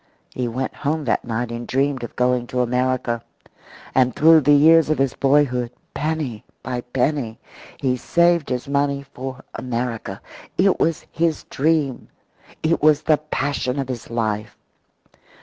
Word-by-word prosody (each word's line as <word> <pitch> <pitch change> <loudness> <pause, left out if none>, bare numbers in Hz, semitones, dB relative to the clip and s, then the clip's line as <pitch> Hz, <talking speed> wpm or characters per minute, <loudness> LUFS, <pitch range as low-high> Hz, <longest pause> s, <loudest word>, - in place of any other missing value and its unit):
He 125 -1 -2
went 130 +3 -3
home 150 +1 -1
that 115 - 0
night 120 0 -2
and 115 0 -5
dreamed 135 0 0
of 120 - -7
going 125 -1 +1
to 125 +1 -1
America. 125 -1 0 0.7
And 130 -2 +3
through 160 +1 +6
the 145 +1 +4
years 160 +2 +6
of 155 - +2
his 135 -2 +1
boyhood, 135 -3 +2 0.2
penny 150 -8 -3 0.2
by 125 0 -3
penny, 125 -2 -1 0.4
he 130 -2 0
saved 170 +3 +2
his 125 0 -3
money 140 0 0
for 130 -1 -8
America. 115 -5 -4 0.4
It 190 0 +3
was 165 -1 0
his 165 -1 0
dream. 150 -2 0 0.6
It 160 +1 +1
was 150 -1 +4
the 155 - +4
passion 145 -3 -2
of 135 -2 -2
his 125 -3 -5
life. 110 -3 -2
130 Hz, 150 wpm, -21 LUFS, 125-150 Hz, 0.7 s, through